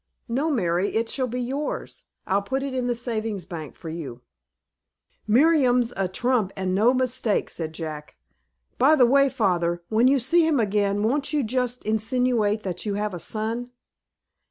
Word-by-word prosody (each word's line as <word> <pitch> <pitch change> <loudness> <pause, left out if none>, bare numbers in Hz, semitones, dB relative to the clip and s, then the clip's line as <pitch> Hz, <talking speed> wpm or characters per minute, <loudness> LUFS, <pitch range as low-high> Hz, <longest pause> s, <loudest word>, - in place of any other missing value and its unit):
"No, 270 +7 0
Mary, 185 - 0
it 225 +1 0
shall 260 -2 -1
be 250 +1 -4
yours. 270 +5 -4 0.2
I'll 195 +2 +1
put 265 +7 -2
it 275 -1 -4
in 255 -1 -1
the 240 - 0
Savings 220 -5 -3
Bank 160 -5 -7
for 165 - -8
you." 140 -7 -7 1.1
"Merriam's 250 -1 +4
a 195 -1 0
trump, 225 +1 0
and 185 -1 -1
no 215 +6 +4
mistake," 255 -4 0
said 160 -2 -5
Jack. 155 -2 -7 0.6
"By 280 +5 +6
the 255 -5 +6
way, 275 +3 +4
father, 175 -6 0
when 225 +3 +4
you 275 +1 +4
see 330 +8 +3
him 315 -4 +2
again, 205 -1 +1
won't 275 +7 0
you 295 -2 +2
just 250 +1 -2
insinuate 220 -1 +1
that 180 -2 -4
you 205 -2 -2
have 210 -1 -2
a 175 - -5
son? 225 +7 -3
225 Hz, 170 wpm, -24 LUFS, 195-255 Hz, 1.1 s, By